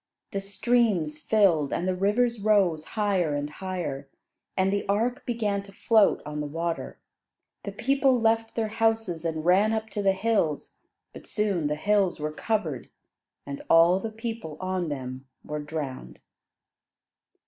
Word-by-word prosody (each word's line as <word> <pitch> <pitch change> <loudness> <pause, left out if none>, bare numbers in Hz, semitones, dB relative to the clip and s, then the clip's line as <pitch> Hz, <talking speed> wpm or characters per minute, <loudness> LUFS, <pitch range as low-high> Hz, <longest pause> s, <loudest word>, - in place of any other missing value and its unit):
The 195 - -2
streams 195 -6 +1
filled, 170 -6 +3
and 180 - -1
the 185 - +2
rivers 215 +5 +1
rose 195 -7 +2
higher 190 -8 +1
and 145 0 -2
higher, 150 -5 -5 0.5
and 190 +1 +2
the 200 - 0
ark 230 +5 0
began 215 -4 0
to 200 0 -14
float 215 +1 +3
on 150 0 -5
the 150 - -3
water. 165 +3 -3 0.7
The - - -3
people 270 -2 +2
left 225 0 +1
their 220 -2 -1
houses 225 -6 0
and 160 -1 -2
ran 200 +5 +4
up 220 -1 -3
to 205 - -2
the 195 -1 +3
hills; 190 -7 -1 0.3
but - - -12
soon 200 -8 0
the 150 - -1
hills 195 +1 +1
were 150 0 -2
covered, 160 - -2 0.6
and 140 0 -6
all 170 +3 +6
the 225 - -4
people 225 -7 -6
on 185 -2 -2
them 130 -1 -6 0.2
were 150 0 -4
drowned. 145 - -6
190 Hz, 150 wpm, -26 LUFS, 155-220 Hz, 0.7 s, all